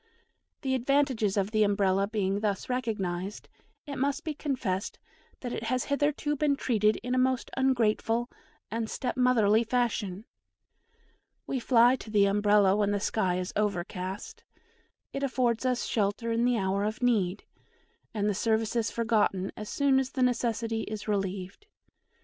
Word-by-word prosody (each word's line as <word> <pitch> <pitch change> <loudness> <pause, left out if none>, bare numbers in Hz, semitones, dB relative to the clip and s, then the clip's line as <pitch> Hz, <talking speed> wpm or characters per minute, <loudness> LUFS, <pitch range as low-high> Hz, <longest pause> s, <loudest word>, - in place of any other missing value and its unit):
The 265 -2 -1
advantages 260 -5 +1
of 200 +1 0
the 215 -1 +2
Umbrella 200 -1 +2
being 200 -2 -1
thus 205 0 -2
recognised, 205 -6 -3 0.4
it 280 -3 -6
must 280 +1 -1
be 315 - -3
confessed 250 -10 -3 0.4
that 245 -2 -4
it 225 - -4
has 255 +1 0
hitherto 295 +1 0
been 290 0 +2
treated 215 -5 +2
in 250 +1 -2
a 255 - +2
most 260 0 0
ungrateful 240 -2 +1 0.4
and 225 0 -2
step 255 - -3
motherly 235 -4 +4
fashion. 225 -4 -1 1.2
We 265 - -2
fly 245 +1 +5
to 225 - -10
the 205 -2 +4
Umbrella 205 -1 +4
when 205 -1 +1
the 205 0 0
sky 190 -3 0
is 180 0 -4
overcast 200 - -3 0.7
it 275 - -3
affords 255 -3 0
us 250 -1 0
shelter 215 +2 -1
in 230 +1 +1
the 245 -1 +2
hour 195 0 0
of 215 +4 -3
need 205 -6 +1 0.7
and 210 -2 -1
the 210 - +2
service 220 +2 0
is 230 -2 +1
forgotten 215 -5 0
as 210 0 -7
soon 275 -2 +3
as 265 -1 -3
the 260 - +1
necessity 230 -2 0
is 215 -1 -6
relieved. 195 - -3
225 Hz, 155 wpm, -28 LUFS, 205-255 Hz, 1.2 s, fly